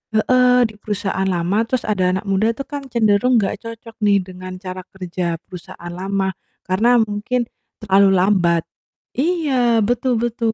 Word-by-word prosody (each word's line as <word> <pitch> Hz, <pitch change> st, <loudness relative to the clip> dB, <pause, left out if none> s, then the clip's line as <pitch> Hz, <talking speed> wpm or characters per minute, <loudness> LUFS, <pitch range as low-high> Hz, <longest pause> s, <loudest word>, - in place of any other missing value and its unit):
heeh, 250 Hz, +2 st, +4 dB
di 220 Hz, -3 st, -4 dB
perusahaan 200 Hz, -2 st, -2 dB
lama, 190 Hz, +5 st, 0 dB
terus 255 Hz, 0 st, -1 dB
ada 185 Hz, -3 st, +1 dB
anak 190 Hz, -, -3 dB
muda 210 Hz, +4 st, +1 dB
tuh 275 Hz, -, -5 dB
kan 290 Hz, 0 st, -6 dB
cenderung 235 Hz, 0 st, +2 dB
gak 195 Hz, +1 st, -2 dB
cocok 230 Hz, 0 st, -9 dB
nih 200 Hz, -2 st, +3 dB
dengan 185 Hz, 0 st, -9 dB
cara 185 Hz, 0 st, -7 dB
kerja 180 Hz, -2 st, -4 dB
perusahaan 175 Hz, -1 st, -10 dB
lama. 190 Hz, +1 st, -1 dB, 0.3 s
Karena 220 Hz, +7 st, +3 dB
mungkin 225 Hz, +2 st, 0 dB, 0.4 s
terlalu 195 Hz, -1 st, +5 dB
lambat. 180 Hz, -3 st, +3 dB, 0.6 s
Iya, 265 Hz, -8 st, +2 dB
betul 245 Hz, +3 st, +1 dB
betul. 235 Hz, -1 st, -1 dB
210 Hz, 150 wpm, -20 LUFS, 190-235 Hz, 0.6 s, terlalu